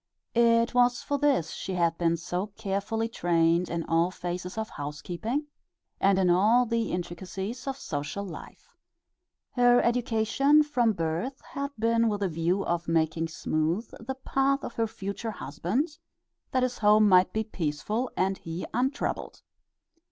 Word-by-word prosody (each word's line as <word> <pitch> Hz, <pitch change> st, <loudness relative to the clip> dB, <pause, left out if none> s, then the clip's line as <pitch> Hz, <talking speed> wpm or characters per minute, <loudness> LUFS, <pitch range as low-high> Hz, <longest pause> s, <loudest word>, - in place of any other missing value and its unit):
It 235 Hz, 0 st, +4 dB
was 245 Hz, -1 st, +3 dB
for 285 Hz, 0 st, -1 dB
this 270 Hz, -, +2 dB
she 190 Hz, -, -4 dB
had 170 Hz, -2 st, +2 dB
been 170 Hz, -1 st, +2 dB
so 180 Hz, +4 st, -3 dB
carefully 215 Hz, +2 st, -2 dB
trained 170 Hz, -4 st, +2 dB
in 170 Hz, 0 st, -2 dB
all 165 Hz, +2 st, +2 dB
phases 180 Hz, +1 st, -5 dB
of 220 Hz, 0 st, -3 dB
housekeeping, 175 Hz, -, -4 dB, 0.5 s
and 195 Hz, 0 st, +4 dB
in 190 Hz, -1 st, +3 dB
all 210 Hz, +8 st, +4 dB
the 230 Hz, -1 st, -1 dB
intricacies 190 Hz, +8 st, -5 dB
of 270 Hz, 0 st, -2 dB
social 150 Hz, -, -4 dB
life. 175 Hz, -5 st, -11 dB, 0.8 s
Her 245 Hz, -1 st, +5 dB
education 245 Hz, +5 st, +3 dB
from 245 Hz, -7 st, +1 dB
birth 170 Hz, -, -2 dB
had 280 Hz, 0 st, -5 dB
been 230 Hz, +1 st, +2 dB
with 205 Hz, -1 st, -2 dB
a 190 Hz, -, +1 dB
view 170 Hz, +4 st, 0 dB
of 170 Hz, 0 st, -1 dB
making 165 Hz, 0 st, +1 dB
smooth 165 Hz, +6 st, -1 dB
the 265 Hz, +4 st, -5 dB
path 270 Hz, +1 st, 0 dB
of -, -, -5 dB
her 230 Hz, -1 st, 0 dB
future 200 Hz, +2 st, -5 dB
husband 220 Hz, -, -3 dB, 0.5 s
that 255 Hz, -2 st, +1 dB
his 250 Hz, -1 st, -1 dB
home 210 Hz, 0 st, +5 dB
might 185 Hz, -1 st, +5 dB
be 220 Hz, -, -1 dB
peaceful 210 Hz, +6 st, -2 dB
and 190 Hz, +1 st, +1 dB
he 165 Hz, +2 st, -5 dB
untroubled. 265 Hz, +3 st, -2 dB
205 Hz, 150 wpm, -28 LUFS, 175-240 Hz, 0.8 s, Her